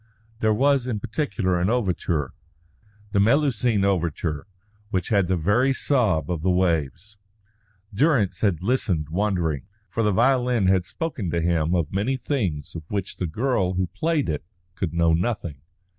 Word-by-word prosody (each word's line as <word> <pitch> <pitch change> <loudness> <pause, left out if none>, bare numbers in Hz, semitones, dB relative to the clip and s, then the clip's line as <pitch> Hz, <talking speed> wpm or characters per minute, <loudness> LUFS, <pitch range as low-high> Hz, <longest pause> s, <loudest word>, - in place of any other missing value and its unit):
There 110 -1 +2
was 135 +3 +2
in 115 -4 -2
particular 105 -6 -1
an 90 - +1
overture 90 - -1 0.8
the 100 - +2
Melusine 115 -3 +2
overture 85 -4 -1 0.4
which 95 -4 -2
had 100 -5 +2
the 95 0 +1
very 110 - +2
sob 105 - +1
of 85 -3 -2
the 95 - +1
waves. 90 - 0 0.7
Durrance 125 - +2
had 90 -6 +1
listened 95 - 0
wondering, 85 -7 -1 0.2
for 115 - -1
the 105 -2 +2
violin 125 0 +2
had 95 -2 +2
spoken 140 - -4
to 85 - 0
him 85 0 +1
of 85 -2 -1
many 110 +8 0
things 100 - -2
of 85 - -6
which 100 -2 -4
the 90 - -2
girl 95 - 0
who 95 0 +1
played 165 -2 0
it 75 -3 -2 0.3
could 90 -3 -3
know 85 0 +2
nothing. 85 - -2
95 Hz, 155 wpm, -24 LUFS, 85-120 Hz, 0.8 s, There